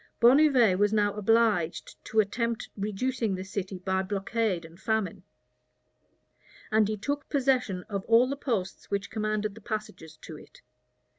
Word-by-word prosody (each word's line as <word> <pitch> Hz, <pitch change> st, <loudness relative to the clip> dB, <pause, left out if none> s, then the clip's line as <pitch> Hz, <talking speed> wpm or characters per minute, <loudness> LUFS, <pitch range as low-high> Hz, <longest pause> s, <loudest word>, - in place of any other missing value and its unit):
Bonnivet 245 Hz, -6 st, +5 dB
was 205 Hz, 0 st, +3 dB
now 205 Hz, -2 st, +2 dB
obliged 210 Hz, -5 st, +1 dB
to 220 Hz, -, 0 dB
attempt 230 Hz, +2 st, -1 dB
reducing 215 Hz, +1 st, -1 dB
the 185 Hz, -, -5 dB
city 190 Hz, -1 st, -5 dB
by 190 Hz, +1 st, -1 dB
blockade 195 Hz, -1 st, -1 dB
and 165 Hz, +2 st, -15 dB
famine; 215 Hz, -3 st, -1 dB, 1.5 s
and 215 Hz, -1 st, +4 dB
he 215 Hz, 0 st, -2 dB
took 285 Hz, +7 st, -3 dB
possession 255 Hz, -9 st, +1 dB
of 200 Hz, -1 st, -4 dB
all 230 Hz, +2 st, +5 dB
the 275 Hz, -, -2 dB
posts 225 Hz, -10 st, -3 dB
which 200 Hz, 0 st, -3 dB
commanded 215 Hz, -1 st, -1 dB
the 225 Hz, -, -13 dB
passages 190 Hz, -8 st, -6 dB
to 155 Hz, -, -10 dB
it. -, -, -18 dB
210 Hz, 145 wpm, -28 LUFS, 190-230 Hz, 1.5 s, Bonnivet